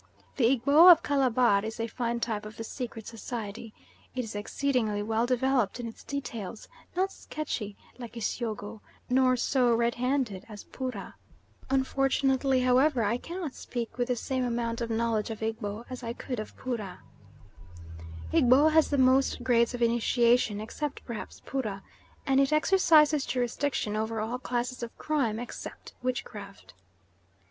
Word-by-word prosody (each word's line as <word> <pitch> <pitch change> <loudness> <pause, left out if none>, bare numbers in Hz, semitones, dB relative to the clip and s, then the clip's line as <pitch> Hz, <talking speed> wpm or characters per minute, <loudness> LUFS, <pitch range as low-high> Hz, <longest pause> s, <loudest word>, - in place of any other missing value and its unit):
The 255 - +3
Egbo 280 +8 +7
of 335 -1 +6
Calabar 250 -7 +3
is 220 +1 -5
a 230 - 0
fine 235 0 -2
type 220 -3 -2
of 215 +1 -10
the 225 - -4
secret 225 -2 -6
society. 225 -1 -6 0.4
It 255 - -1
is 225 - -7
exceedingly 215 -1 -1
well 225 +2 0
developed 255 -3 +1
in 240 - -4
its 225 - -10
details, 230 -7 -6 0.3
not 380 +2 +1
sketchy 220 - -5 0.2
like 240 -1 -8
Isyogo, 220 -2 -4 0.3
nor 255 0 +4
so 250 -1 +2
red 235 +1 +1
handed 250 -6 -1
as 205 -2 -9
Poorah. 255 -7 -6 0.6
Unfortunately, 270 0 +2
however, 255 0 +3
I 215 +3 +1
cannot 335 0 -6
speak 240 0 -6
with 245 - +1
the 250 - +1
same 260 +2 -2
amount 235 -1 -2
of 230 - -2
knowledge 225 -1 0
of 220 0 -5
Egbo 220 0 -3
as 255 0 -7
I 230 -1 -4
could 250 -1 -5
of 215 - -7
Poorah. 225 -7 -5 1.3
Egbo 260 +5 +6
has 320 0 +4
the 285 - +1
most 260 0 +3
grades 240 -1 +3
of 240 - -1
initiation, 235 -1 +3
except 280 +7 -5
perhaps 235 -3 -7
Poorah, 215 -8 -3 0.4
and 270 -1 +3
it 275 +1 +3
exercises 305 -3 +5
jurisdiction 245 -3 -1
over 220 +1 -2
all 230 +4 -2
classes 250 0 -3
of 235 -1 -7
crime 270 -8 0
except 240 +1 -8
witchcraft. 205 - -5
240 Hz, 150 wpm, -29 LUFS, 225-265 Hz, 1.3 s, Egbo